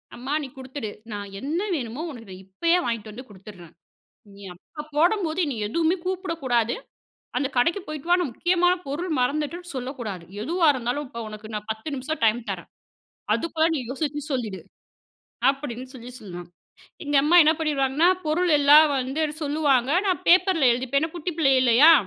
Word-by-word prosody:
அம்மா 260 +4 -4
நீ - - -5
குடுத்துடு! 260 -4 -6 0.2
நான் 205 -1 -5
என்ன 305 +6 -2 0.2
வேணுமோ, 245 +1 -4
உனக்கு 225 -6 -11
நான் 185 +1 -10
இப்பயே 335 - +1
வாங்கிட்டு 225 -2 -3
வந்து 255 +4 -10
குடுத்துடுறேன். 190 -4 -13 0.6
நீ 200 - -13
அப்ப 300 - -11
போடம்போது 345 0 +2
என்னை 270 -6 -3
எதுவுமே 330 - +1
கூப்பிடக்கூடாது. 325 - -1 0.6
அந்த 280 - +1
கடைக்கு 335 +10 +2
போயிட்டு 305 +1 -7
வா 355 - +6
நான் 330 -7 -1
முக்கியமான 355 +3 +2
பொருள் 330 +5 -3
மறந்துட்டுன்னு 305 +6 -2
சொல்லக்கூடாது! 240 - -5 0.2
எதுவா 335 +6 +1
இருந்தாலும், 255 +4 -2
இப்ப 235 -3 -8
உனக்கு 215 0 -9
நான் 210 +1 -5
10 220 +7 -6
நிமிஷம் 275 +3 -4
டைம் 220 +2 +3
தரேன். - - -7 0.7
அதுக்குள்ள 325 -1 0
நீ - - -1
யோசிச்சு 295 +1 -3
சொல்லிடு" 215 -9 -3 0.9
அப்டின்னு 260 -3 -2
சொல்லி 245 0 -9
சொல்வேன். 175 -4 -8 0.6
எங்க 290 0 -1
அம்மா 335 +4 +4
என்ன 310 - +5
பண்ணிருவாங்கன்னா, 295 +2 +2 0.2
பொருள் 340 +2 +1
எல்லாம் 295 +2 +7
வந்து 265 +5 -2 0.2
சொல்லுவாங்க 285 -3 +2
நான் 370 -2 0
பேப்பர்ல 355 -7 +5
எழுதிப்பேன். 260 +3 0
ஏனா, - - -14
குட்டி 345 +1 -3
பிள்ளை 275 -4 +3
இல்லையா? 260 +6 +7
280 Hz, 160 wpm, -24 LUFS, 235-320 Hz, 0.9 s, எல்லாம்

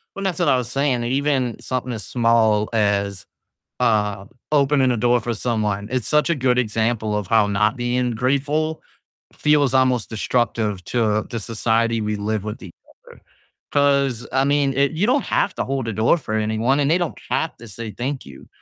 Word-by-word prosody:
Well, - - -6
and 195 - -2
that's 190 -2 -2
what 175 - +1
I 130 - +4
was 120 -1 -4
saying, 135 -2 0
that 120 - -2
even 135 -3 0
something 130 -1 -3
as 110 -3 -6
small 115 -3 +2
as, 100 -3 0 0.6
um, 105 -2 0 0.2
opening 140 -2 +3
a 120 - 0
door 120 +2 +3
for 120 0 -3
someone, 105 -3 -2
it's 130 -3 -1
such 150 +2 +2
a 170 - +2
good 125 -2 +1
example 110 -2 0
of 105 -3 -3
how 110 +1 +4
not 105 +1 +1
being 125 0 0
grateful 145 +6 -1 0.5
feels 145 -3 +2
almost 130 -3 +2
destructive 110 -3 -1
to 110 -2 +1
the 115 - -4
society 115 +1 0
we 105 0 -1
live 105 0 -2
with 105 +1 -6
each 90 -3 -10 0.3
other. - - -15 0.5
'Cause, 140 -4 +2
I 135 +1 +3
mean, 140 -1 +2
it 140 +1 +2
you 165 +6 +1
don't 265 +2 +2
have 195 - 0
to - - -2
hold 135 -3 -2
a 115 - -2
door 110 - +3
for 125 -8 -6
anyone, 110 +5 +1
and 140 -1 +2
they 170 - +4
don't 175 -2 -3
have 160 - -1
to 115 - -12
say, 110 +1 -7
"Thank 130 +6 -4
you," 65 -1 -13
120 Hz, 195 wpm, -21 LUFS, 110-135 Hz, 0.6 s, I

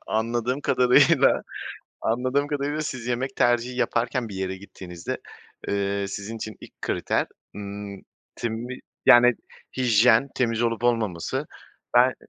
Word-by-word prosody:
Anladığım 120 +4 -1
kadarıyla 135 +3 +4 0.6
anladığım 130 +5 0
kadarıyla 145 +1 -1
siz 130 -6 -5
yemek 125 +2 -2
tercihi 120 +1 +2
yaparken 120 -1 0
bir 100 - -8
yere 95 0 -3
gittiğinizde, 90 -3 -7 0.5
eee, 100 0 0
sizin 100 +3 -5
için 110 -1 -6
ilk - - -15
kriter, - - 0 0.3
ımm, 100 -1 -7 0.3
temi 120 +2 -4 0.3
yani, 120 0 +8 0.4
hijyen, 120 0 +4
temiz 115 -2 0
olup 115 0 -1
olmaması. 110 -8 0 0.5
Ben 125 +1 +6
120 Hz, 115 wpm, -25 LUFS, 105-125 Hz, 0.6 s, yani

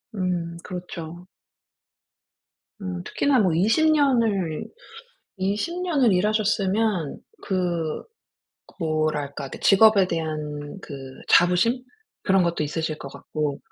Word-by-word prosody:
음 175 -3 -2
그렇죠. 175 -1 -7 1.5
음 180 -2 -4
특히나 275 +6 +1
뭐 185 -6 +3
20 225 - +3
년을, 230 - +2 0.7
20 210 - -1
년을 285 - +3
일하셨으면 205 -3 +1 0.3
그 175 -4 -1 0.8
뭐랄까, 155 -4 -1
그 - - -8
직업에 200 -1 +6
대한 155 -2 -4
그 145 - -8 0.3
자부심? 180 +8 +4 0.4
그런 195 -1 +4
것도 170 -2 0
있으실 155 +1 -2
것 140 - -7
같고 150 -2 -3
180 Hz, 185 characters per minute, -24 LUFS, 160-215 Hz, 1.5 s, 직업에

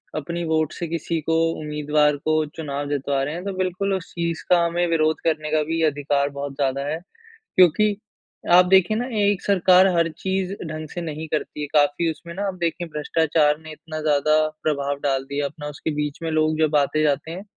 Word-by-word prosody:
अपनी 170 +3 -3
वोट 160 -1 +1
से 170 - -4
किसी 165 0 -2
को 165 +2 -1 0.3
उम्मीदवार 150 -1 +1
को 155 +2 +1
चुनाव 145 -2 -4
जितवा 140 -1 -1
रहे 145 +2 -3
हैं 175 +2 -5
तो 200 - -2
बिल्कुल 185 +2 -1
उस 190 -3 -4
चीज़ 170 -1 -2
का 175 -1 +5
हमें 170 +1 0
विरोध 160 -1 +1
करने 155 -2 -1
का 155 0 +3
भी 165 +2 -2
अधिकार 145 -2 +1
बहुत 140 0 -4
ज़्यादा 140 0 -1
है। 155 +2 -2 0.6
क्योंकि 195 +4 +5 0.6
आप 180 +1 +8
देखिए 190 +3 +4
ना 245 - -1 0.2
एक 205 -1 +2
सरकार 185 -1 +5
हर 165 -1 +2
चीज़ 190 0 -2
ढंग 155 0 -6
से 175 - -5
नहीं 160 -1 -5
करती 150 -1 -3
है। 145 - -3
काफ़ी 145 +2 +3
उसमें 170 +2 -10
ना 195 +3 -4
आप 195 - -2
देखिए 170 +1 -2
भ्रष्टाचार 150 -1 +1
ने 155 0 -11
इतना 155 0 -8
ज़्यादा 155 0 +3 0.3
प्रभाव 140 -2 -1
डाल 135 -2 +1
दिया 140 0 -1
अपना 150 +1 -6
उसके 150 +2 -4
बीच 150 -1 -3
में 165 - -1
लोग 155 0 +1
जब 155 -1 +2
आते-जाते 150 +1 +1
हैं 180 +3 -7
155 Hz, 200 wpm, -23 LUFS, 150-170 Hz, 0.6 s, आप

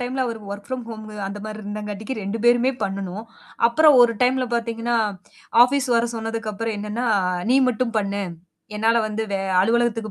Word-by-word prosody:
டைம்ல 255 +1 -1
அவரு 230 -2 -4
work 200 0 -7
from 255 -2 -4
home 220 -1 -7 0.2
அந்த 205 - -6
மாரி 215 0 -6
இருந்தங்காட்டிக்கு 210 +3 -5
2 200 +3 -3
பேருமே 245 +2 +4
பண்ணணும். 195 +2 -4 0.4
அப்புறம் 300 +4 +5
ஒரு 235 -1 +4
டைம்ல 255 +1 +3
பார்த்தீங்கன்னா, 230 0 -1 0.7
ஆஃபீஸ் 270 +1 +2
வர 230 +1 +2
சொன்னதுக்கப்புறம் 225 -1 -3
என்னன்னா, 210 +4 -3 0.4
நீ 260 - +5
மட்டும் 240 0 -1
பண்ணு. 200 0 -2 0.5
என்னால 225 +2 +2
வந்து 215 +1 -3
வே 195 - 0 0.2
அலுவலகத்துக்கு 225 +1 +1
230 Hz, 155 wpm, -22 LUFS, 210-240 Hz, 0.7 s, அப்புறம்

